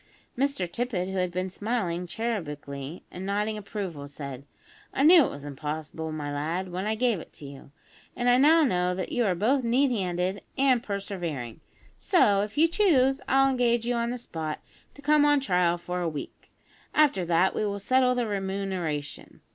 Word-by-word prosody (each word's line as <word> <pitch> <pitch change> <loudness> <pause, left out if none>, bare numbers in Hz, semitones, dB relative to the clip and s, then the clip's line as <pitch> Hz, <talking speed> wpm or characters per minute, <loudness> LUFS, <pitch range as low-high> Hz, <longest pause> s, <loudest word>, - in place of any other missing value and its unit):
Mr 275 -6 0
Tippet, 195 -3 -2
who 190 - -4
had 180 -1 0
been 185 +1 -3
smiling 185 -5 -2
cherubically, 150 - -5
and 180 - -7
nodding 205 +2 -1
approval, 195 -8 -6
said: 140 -2 -8 0.5
"I 270 - 0
knew 325 -1 +8
it - - -2
was 145 0 -8
impossible, 155 +2 -5
my 145 -2 -4
lad, 170 +6 -3
when 185 +3 -3
I 220 - 0
gave 235 -4 +1
it - - -12
to 145 - -11
you, 140 0 -11 0.4
and 245 - -1
I 245 +1 +5
now 315 +4 +6
know 180 -8 +1
that 185 - -4
you 245 -2 +1
are 185 - +1
both 250 +9 +1
neat 255 +4 +2
handed 185 -2 -1 0.2
and 265 -3 +3
persevering; 175 - -5 0.4
so, 205 - +4
if 210 +4 -5
you 320 +2 +6
choose, 280 -8 +3
I'll 270 0 +4
engage 240 -2 +1
you 245 - 0
on 235 0 0
the 250 - -3
spot 160 -9 -5 0.4
to 285 - -14
come 300 0 +4
on 290 -1 +4
trial 180 -9 +1
for 180 +1 -4
a 170 - 0
week. 150 -2 -8 0.4
After 285 -12 +4
that 175 +2 +3
we - - -1
will 200 -1 -1
settle 250 +5 +2
the 245 -1 0
remuneration. 190 -7 -4
195 Hz, 185 wpm, -27 LUFS, 170-245 Hz, 0.5 s, knew